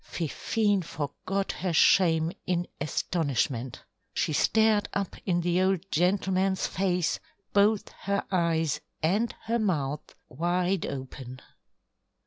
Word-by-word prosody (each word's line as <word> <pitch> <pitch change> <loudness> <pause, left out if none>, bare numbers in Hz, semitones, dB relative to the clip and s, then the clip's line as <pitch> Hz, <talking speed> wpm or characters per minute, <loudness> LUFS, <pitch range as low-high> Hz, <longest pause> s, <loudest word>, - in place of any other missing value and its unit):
Fifine 200 +5 0
forgot 185 +5 -3
her 180 -2 -3
shame 165 -2 +4 0.2
in 175 -1 0
astonishment. 140 -5 -1 0.3
She 155 - 0
stared 220 +5 +3
up 200 -2 -2
in 175 -2 +2
the 175 +1 +1
old 190 -2 +2
gentleman's 190 +2 +1
face, 180 -3 0 0.3
both 205 +1 +3
her 200 0 -1
eyes 165 -4 +1 0.2
and 205 +9 +2
her 230 +1 0
mouth 150 -9 -2
wide 175 +5 0
open. 130 -1 -7
180 Hz, 110 wpm, -28 LUFS, 160-195 Hz, 0.3 s, shame